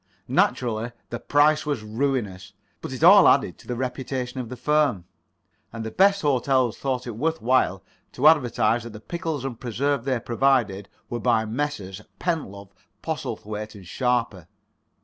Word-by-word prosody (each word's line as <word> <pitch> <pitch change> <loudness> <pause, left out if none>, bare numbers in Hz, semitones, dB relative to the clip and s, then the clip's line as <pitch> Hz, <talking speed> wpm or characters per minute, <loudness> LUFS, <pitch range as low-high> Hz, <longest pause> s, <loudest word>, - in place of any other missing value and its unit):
Naturally 115 -1 0 0.2
the 120 - -4
price 150 +1 +3
was 145 -7 -3
ruinous. 105 -5 -2 0.3
But - - -6
it 130 +4 -5
all 195 +3 +8
added 135 -11 +3
to - - -17
the 125 - -3
reputation 130 0 -4
of 120 -3 -5
the 125 - -6
firm. 130 - +1 0.7
And 115 -1 -6
the 110 - -5
best 195 - +3
hotels 130 -4 +1
thought 130 -2 -2
it 120 - -4
worth 160 +7 -1
while 115 -6 +1 0.3
to 140 +5 +3
advertise 120 -6 +3
that 120 -1 -9
the 105 - -9
pickles 160 +1 -4
and 125 -4 -5
preserves 130 +2 -1
they 130 -3 0
provided 115 -5 +1 0.2
were 120 - -4
by 115 -2 +2
Messrs. 110 -6 -4 0.2
Pentlove, 100 - -3 0.3
Postlethwaite 105 +1 -5
and 100 -3 -12
Sharper. 115 - -1
125 Hz, 155 wpm, -24 LUFS, 110-140 Hz, 0.7 s, all